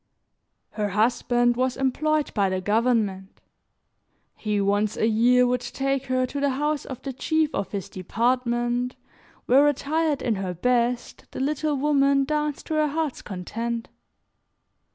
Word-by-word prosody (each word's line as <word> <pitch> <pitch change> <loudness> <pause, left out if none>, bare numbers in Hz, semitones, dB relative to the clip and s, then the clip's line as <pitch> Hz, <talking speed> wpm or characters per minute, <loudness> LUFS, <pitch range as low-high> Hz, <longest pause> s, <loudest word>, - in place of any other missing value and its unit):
Her 210 -1 -2
husband 240 +3 +2
was 255 +1 0
employed 300 +3 0
by 200 -2 +2
the 185 0 -1
government; 205 -2 0 1.0
he, 210 -2 -1
once 205 +1 +1
a - - +2
year, 245 +3 +4
would 250 0 0
take 275 +1 -2
her 255 0 +1
to 280 +3 -5
the 280 0 +2
house 295 +2 -1
of 260 - -8
the 270 - -4
chief 315 +3 0
of 200 - -3
his 200 -3 -4
department 240 +4 -1 0.5
where, 275 +4 +5
attired 295 +1 0
in 225 -4 0
her 185 -2 -3
best, 245 +4 0
the - - -5
little 300 +2 0
woman 275 -1 +3
danced 300 0 -2
to - - -4
her 305 -1 +2
heart's 305 -1 -2
content. 230 +5 -4
250 Hz, 145 wpm, -25 LUFS, 220-280 Hz, 1.0 s, where